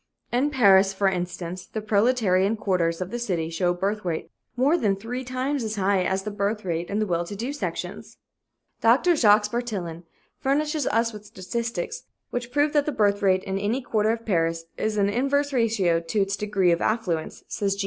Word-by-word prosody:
In 255 +4 +2
Paris, 195 -8 +5
for 195 0 +1
instance, 180 -1 -3
the 220 - -4
proletarian 210 -2 +2
quarters 180 -4 0
of 185 +1 -4
the 240 - -3
city 170 -8 -2
show 175 +2 0
a - - +2
birth 200 +4 -2
rate 170 -3 -3 0.2
more 270 +6 +3
than 210 - +1
three 235 +6 -5
times 255 +2 -2
as 220 -1 -3
high 195 -1 +2
as 190 +1 -1
the 210 - -4
birth 205 +1 -2
rate 170 -1 -2
in 200 - -1
the 215 - +1
well 170 -3 0
to 190 +4 -7
do 240 +7 -3
sections. 290 - -5 0.6
"Dr. 265 +10 +4
Jacques 210 -5 +4
Bartillon 200 -9 -3 0.4
furnishes 295 +1 0
us 230 +1 +1
with 210 0 -10
statistics 225 - -4 0.3
which 245 0 -4
prove 290 +3 +2
that 295 -1 +2
the - - +1
birth 205 -5 +2
rate 190 -1 +3
in 195 0 -2
any 210 +6 0
quarter 220 -4 0
of 230 0 -1
Paris 165 -4 0
is 215 0 -2
in 200 -1 +3
inverse 275 +6 0
ratio 215 -9 +2
to 170 +5 -2
its 195 0 0
degree 205 -4 +1
of 170 - +1
affluence," 180 -8 -1
says 200 -1 -1
G. - - -12
210 Hz, 200 wpm, -25 LUFS, 185-240 Hz, 0.6 s, Paris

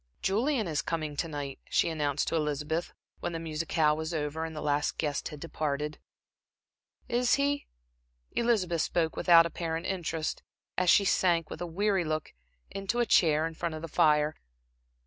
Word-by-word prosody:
"Julian 225 +3 +1
is 155 -3 0
coming 155 -3 -3
to 165 - -1
night," 145 -3 -5
she - - +3
announced 150 -3 -1
to - - -1
Elizabeth, 150 +2 -1 0.3
when 175 - -3
the 165 - -3
musicale 155 -1 +1
was 160 +2 -3
over 155 +1 -2
and 160 -1 -7
the - - -4
last 145 0 0
guest 145 -3 -1
had 150 - -8
departed. 150 -2 -3 1.1
"Is 245 +1 +3
he?" 285 +1 0 0.6
Elizabeth 195 -9 +1
spoke 165 -1 0
without 170 -2 +6
apparent 165 0 -3
interest, 165 -4 -2 0.3
as 180 -1 +2
she 200 - +6
sank, 170 -4 +2
with - - -7
a 175 - -2
weary 195 +2 +1
look, 155 -1 -3 0.4
into 195 +4 -2
a 240 - +3
chair 160 -6 +4
in 165 - -4
front 160 0 -3
of 155 - -7
the - - -3
fire. 150 0 +3
165 Hz, 165 wpm, -29 LUFS, 150-180 Hz, 1.1 s, without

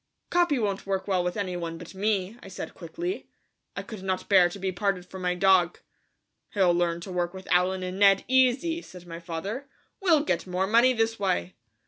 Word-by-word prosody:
"Capi 345 -5 +3
won't 200 -4 -2
work 195 0 -1
well 185 -3 +1
with 180 +2 -2
any 185 -3 -2
one 165 -1 -4
but 170 +2 -10
me," 200 0 -1
I - - -11
said 190 - -7
quickly. 345 - -5 0.5
I - - -4
could 215 -4 -9
not 190 -1 -2
bear 185 -3 +6
to 175 - -8
be 190 -1 -2
parted 185 0 -1
from 190 0 -9
my 180 0 0
dog. 180 -2 +4 0.8
"He'll 185 -3 +4
learn 170 -1 0
to 185 - -7
work 175 0 -2
with 190 - -10
Allen 185 +1 +2
and 185 +1 -4
Ned 195 -1 +5
easy," 260 +6 +3
said 180 - -13
my 165 -1 -8
father; 185 +11 -5 0.3
"we'll 330 -6 +4
get 295 - -1
more 180 +1 0
money 235 +5 +5
this 225 -1 0
way." 90 - 0
190 Hz, 200 wpm, -27 LUFS, 180-215 Hz, 0.8 s, bear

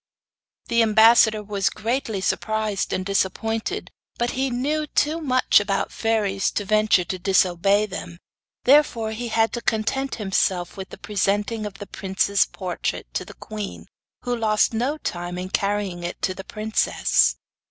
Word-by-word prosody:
The 235 0 +2
ambassador 220 0 +5
was 200 -3 0
greatly 225 -2 -2
surprised 215 0 -1
and 185 - -2
disappointed, 220 - -1 0.3
but 240 0 0
he 265 +1 -1
knew 295 +5 -1
too 310 +3 0
much 255 -4 +4
about 200 -1 -1
fairies 205 -4 0
to 205 - -2
venture 215 -2 +3
to 185 +1 -5
disobey 195 +2 +3
them, 180 -4 -7 0.5
therefore 250 -5 +4
he 240 +2 -4
had 225 0 +1
to 235 - -3
content 245 +5 -1
himself 190 -4 0
with 190 -1 -8
presenting 205 +2 0
the 205 -1 -6
prince's 195 +1 +1
portrait 185 -3 -4
to - - -2
the - - -13
queen, 210 -2 -7 0.4
who 245 0 -1
lost 220 -1 +2
no 255 +7 -1
time 175 - -4
in 185 +1 -5
carrying 200 -3 -1
it 175 - -5
to 185 - +1
the 190 0 -9
princess. 215 +2 +1
215 Hz, 145 wpm, -23 LUFS, 195-230 Hz, 0.5 s, ambassador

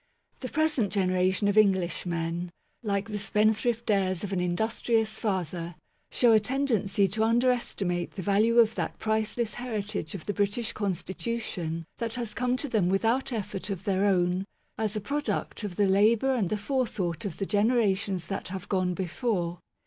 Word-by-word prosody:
The 255 - -5
present 305 -9 +1
generation 185 0 +2
of 205 +1 +4
English 190 -4 +2
men, 170 +1 -2 0.3
like 200 -2 -1
the 210 -1 -3
spendthrift 215 +3 +1
heirs 185 -2 +1
of 200 -1 -3
an 185 - 0
industrious 220 +4 0
father, 175 -4 -2 0.3
show 240 -2 +4
a 220 - +7
tendency 215 -5 +1
to 215 +4 0
underestimate 225 -7 +1
the 190 - -4
value 215 +5 +3
of 225 -2 +6
that - - -3
priceless 220 +1 -1
heritage 215 -8 -4
of 175 - -7
the 205 - -1
British 205 +3 0
Constitution 190 -3 -3
that 230 0 -2
has 235 -3 -3
come 250 +1 0
to 290 - -3
them 210 -8 +1
without 225 +8 +1
effort 210 -3 -4
of 195 -2 -4
their 195 -1 +1
own, 180 -1 +2 0.3
as 215 -1 -1
a 210 - -2
product 285 -1 -2
of 200 -4 -4
the 205 - +3
labour 215 +7 +4
and 215 -9 0
the 215 - 0
forethought 210 - -2
of 200 -6 -4
the 195 - -2
generations 205 -4 +1
that 195 +4 -4
have 185 0 -6
gone 185 -2 0
before. 180 -2 -2
205 Hz, 165 wpm, -28 LUFS, 185-230 Hz, 0.3 s, a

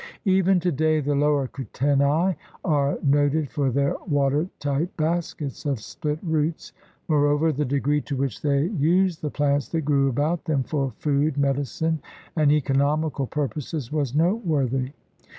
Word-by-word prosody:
Even 190 -1 +4
today 155 -2 +1
the 145 0 0
lower 145 -1 +2
Kutenai 140 +7 +1 0.3
are 145 -5 +1
noted 145 +1 +2
for 140 -2 0
their 140 +2 +1
water 145 +2 +1
tight 145 +4 -2
baskets 155 -3 -2
of 140 -5 -1
split 150 +8 -4
roots. 160 -1 -1 0.3
Moreover 145 0 +3
the 150 0 -1
degree 145 +2 +1
to 140 - -4
which 135 -4 -2
they 140 -1 +2
used 180 0 +2
the 150 - -2
plants 145 -2 0
that 165 - -1
grew 140 -2 +2
about 150 +6 -1
them 150 -5 +1
for 135 -2 -2
food, 145 0 0
medicine, 145 +4 0 0.4
and 155 -3 +4
eco 145 -2 +1
nomical 145 0 +1
purposes 150 -2 -3
was 145 -4 -1
noteworthy. 150 - +1
145 Hz, 145 wpm, -24 LUFS, 140-160 Hz, 0.4 s, Even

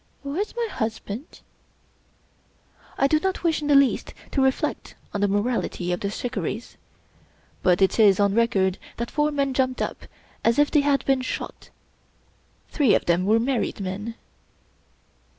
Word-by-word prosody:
"Where's 335 +12 -3
my 475 -1 -1
husband?" 220 - -5 1.6
I - - +3
do 305 +3 +3
not 380 +2 -2
wish 325 -3 +1
in 295 - -3
the 290 - +4
least 275 -1 +3 0.2
to 275 - +1
reflect 265 0 -1 0.2
on 205 - -2
the 205 - +3
morality 205 -3 -1
of 175 - -1
the 200 - -2
^* - - -3
Shikarris 225 -1 -4 0.4
"; - - -34
but 180 +1 +3
it 190 - +2
is 205 -3 +6
on 200 -1 +3
record 200 -5 +2 0.2
that 235 +1 -4
four 295 0 +1
men 280 -2 0
jumped 255 -1 0
up - - -4 0.4
as 230 +1 +3
if 290 0 +3
they 300 - +4
had 280 -1 +1
been 270 -1 +2
shot. 255 - -6 1.0
Three 275 -9 +3
of - - 0
them 175 +2 +2
were 220 +2 +4
married 245 -1 -1
men. 200 +4 -4
240 Hz, 165 wpm, -24 LUFS, 205-280 Hz, 1.6 s, is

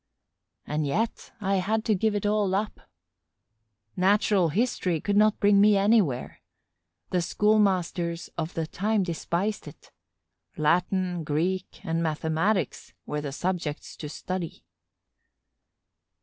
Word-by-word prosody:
And 150 0 -1
yet 220 +11 -2
I 195 -1 +1
had 215 +4 0
to 220 - +3
give 210 +2 +1
it 205 - -2
all 205 -2 +1
up. 210 +2 -4 1.1
Natural 195 -1 +3
history 185 -3 0
could 205 +6 -1
not 215 +1 +4
bring 200 -1 +5
me 210 0 +6
anywhere. 195 - +1 0.7
The 180 - +2
schoolmasters 185 -4 +1
of 160 0 -4
the 165 - -1
time 205 +5 0
despised 175 +3 -2
it; 145 - -13 0.7
Latin, 180 +2 +1
Greek, 175 +5 -2
and 165 +1 0
mathematics 160 - -1
were 150 0 -3
the 145 -2 -4
subjects 170 -1 -3
to 150 - -6
study. 180 +2 -5
185 Hz, 120 wpm, -27 LUFS, 165-205 Hz, 1.1 s, me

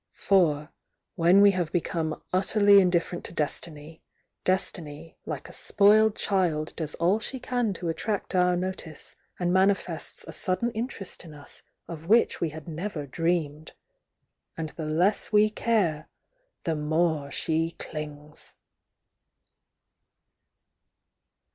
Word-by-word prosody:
For 160 -6 +2 0.4
when 175 +3 +5
we 200 0 +7
have 175 -4 -2
become 165 -2 -2
utterly 200 +2 +5
indifferent 175 -1 0
to - - -5
Destiny, 155 0 -3 0.4
Destiny 165 -4 -2
like - - -5
a - - -12
spoiled 210 +1 +4
child 170 -6 0
does 155 -3 -4
all 180 +6 +2
she 260 +4 -3
can 245 -3 -1
to 180 -2 -5
attract 200 +6 -3
our 180 -1 +3
notice, 175 -4 -5 0.2
and 175 0 0
manifests 190 -3 +1
a - - -9
sudden 190 +6 0
mterest 225 -5 -5
in 160 -3 -12
us 145 -1 -11 0.3
of 165 -1 -8
which 230 +4 +3
we 170 - +1
had 155 +1 -10
never 165 -1 -5
dreamed. 155 0 -2 0.8
And 160 -1 -3
the 155 0 -6
less 175 +10 +1
we 210 0 +4
care, 195 -9 0 0.5
the 165 -2 -1
more 155 -1 0
she 160 +3 0
clings! 150 -2 -9
170 Hz, 125 wpm, -26 LUFS, 155-195 Hz, 0.8 s, we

